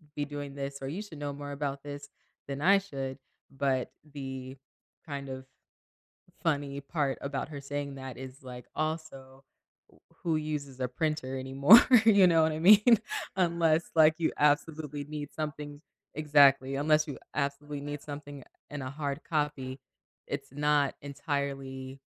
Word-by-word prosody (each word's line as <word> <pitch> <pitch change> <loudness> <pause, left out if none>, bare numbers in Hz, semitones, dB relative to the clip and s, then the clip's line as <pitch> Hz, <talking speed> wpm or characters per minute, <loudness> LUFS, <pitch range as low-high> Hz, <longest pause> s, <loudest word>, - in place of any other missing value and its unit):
be 145 - -1
doing 145 -1 -6
this 140 0 -4
or 135 - -4
you 165 +9 -4
should 205 -7 -10
know 145 -1 -3
more 145 0 -7
about 140 -1 -4
this 145 0 -8 0.4
than 140 0 -4
I 195 +5 +6
should," 135 -8 -6 0.3
but 135 -2 -1
the 135 -3 -7 0.5
kind 140 -3 -6
of 130 0 -7 1.0
funny 140 -4 -1
part 140 -1 -1
about 140 0 -3
her 145 -2 -6
saying 140 0 -4
that 130 -2 -7
is, 130 +1 -9
like, 125 -1 -9
also 145 -4 -4 0.4
w - - -24 0.2
who 165 -2 +1
uses 150 -4 -4
a 125 - 0
printer 135 0 -2
anymore, 135 - +8 0.2
you 200 -4 +7
know 165 -2 +5
what 160 0 +2
I 155 - -3
mean? 210 +5 +7 0.4
Unless, 170 -3 +2
like, 155 0 +7
you 165 - +1
absolutely 150 0 +1
need 145 0 -6
something 150 -1 -5 0.3
exactly, 140 -3 +5
unless 155 +2 +3
you 140 - -5 0.2
absolutely 140 +1 -2
need 145 0 -6
something 145 -2 -8 0.3
in 145 -1 -5
a 130 - -4
hard 145 +1 -4
copy, 145 -4 -2 0.5
it's 140 -1 -5
not 145 0 +2
entirely 135 -2 -4
145 Hz, 150 wpm, -30 LUFS, 135-155 Hz, 1.0 s, anymore